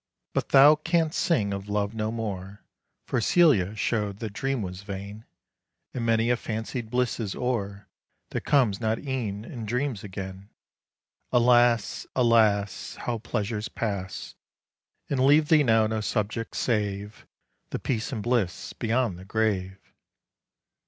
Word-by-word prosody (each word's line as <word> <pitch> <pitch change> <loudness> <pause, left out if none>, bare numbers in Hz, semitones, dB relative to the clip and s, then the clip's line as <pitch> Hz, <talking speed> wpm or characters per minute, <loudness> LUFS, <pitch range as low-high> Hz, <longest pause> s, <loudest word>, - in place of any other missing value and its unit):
But - - -1
thou 145 +3 +8
canst 165 0 0
sing 105 - +1
of 100 +1 -6
love 105 0 -1
no 110 -1 -2
more, 100 -3 -5 0.4
For - - 0
Celia 110 - +4
show'd 105 -2 -1
that 105 -2 -6
dream 135 0 -1
was 90 0 -6
vain; 100 +2 -7 0.7
And 125 - -3
many 115 +1 +2
a 120 - +2
fancied 115 +1 -4
bliss 125 +1 0
is 105 -4 -3
o'er, 105 -5 -3 0.4
That - - -2
comes 120 -9 +2
not 110 0 +1
e'en 115 -7 -4
in 120 -1 -7
dreams 125 -1 -2
again. 95 0 -7 0.8
Alas! 120 -2 +3
alas! 110 -5 +2
How 120 -2 -3
pleasures 110 -1 -3
pass, 100 -5 -4 0.7
And 140 - -1
leave 145 +2 +5
thee 155 -2 +6
now 110 -3 +4
no 110 0 -1
subject, 105 +1 -2
save 105 -2 -2 0.4
The - - -3
peace 115 +1 -2
and 110 -6 -3
bliss 120 -7 -1
beyond 115 -5 0
the 95 - -11
grave! 95 -3 -2
110 Hz, 140 wpm, -26 LUFS, 100-125 Hz, 0.8 s, thou